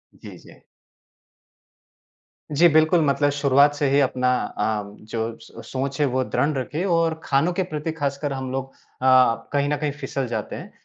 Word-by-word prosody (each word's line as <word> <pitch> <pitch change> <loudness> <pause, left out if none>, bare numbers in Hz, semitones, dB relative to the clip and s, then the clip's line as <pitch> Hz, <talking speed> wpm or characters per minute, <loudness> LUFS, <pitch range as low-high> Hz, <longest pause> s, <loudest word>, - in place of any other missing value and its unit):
जी, - - -12
जी। - - -17 1.9
जी, 165 +4 +5
बिल्कुल। 160 +2 +4
मतलब 145 +1 +2
शुरुआत 140 +1 +4
से 145 -1 0
ही 140 +1 +3
अपना 125 -1 +1
अ, 105 0 -2 0.3
जो 115 0 -3
स 115 - -12
सोच 135 +1 -3
है 145 - +4
वह 130 - +2
दृण 150 +2 +2
रखिए 150 +6 -3
और 165 -1 0
खानों 145 +6 +1
के 190 - 0
प्रति 155 +1 -3
ख़ासकर 140 -2 -3
हम 130 -1 -5
लोग 135 0 -4 0.3
अ, 130 -3 +4
कहीं 145 0 +1
न 150 - 0
कहीं 150 -1 -2
फिसल 135 -2 -3
जाते 110 -3 -4
हैं। - - -9
140 Hz, 170 wpm, -23 LUFS, 130-150 Hz, 1.9 s, जी